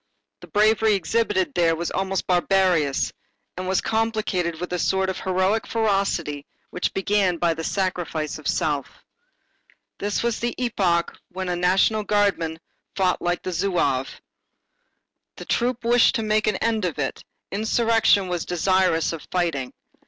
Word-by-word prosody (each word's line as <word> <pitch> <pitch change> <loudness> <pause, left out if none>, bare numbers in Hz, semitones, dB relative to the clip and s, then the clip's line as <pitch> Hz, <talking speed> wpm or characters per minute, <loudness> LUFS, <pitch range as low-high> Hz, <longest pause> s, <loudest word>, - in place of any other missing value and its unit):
The - - -13
bravery 215 0 +3
exhibited 200 -1 0
there 165 -2 +2
was 170 +1 -3
almost 190 0 -1
barbarous 180 -5 +2 0.4
and 185 0 -5
was 190 -1 +1
complicated 215 -7 -1
with 180 0 -5
a 180 - -1
sort 190 +2 +1
of - - -7
heroic 190 +3 0
ferocity 195 -9 -1 0.2
which 180 - -2
began 195 -2 +1
by 170 0 +1
the 160 0 -6
sacrifice 170 -5 -2
of 155 - -7
self. 145 -3 -2 1.0
This 205 +2 -1
was 235 -2 0
the 240 0 -2
epoch 190 -9 0
when 185 0 -4
a 180 - 0
National 190 +5 +2
Guardsman 200 -6 +1 0.4
fought 185 -2 +1
like 175 0 -1
a 185 - -2
Zouave. 170 -8 0 1.2
The - - -9
troop 245 0 -1
wished 240 0 +4
to 225 - -1
make 215 0 +1
an 210 - +2
end 220 +1 0
of 175 -5 -2
it, 135 -2 -3 0.3
insurrection 220 -1 +2
was 175 -2 -2
desirous 180 -2 +1
of 160 - -8
fighting. 165 -8 -1
185 Hz, 145 wpm, -23 LUFS, 170-210 Hz, 1.2 s, wished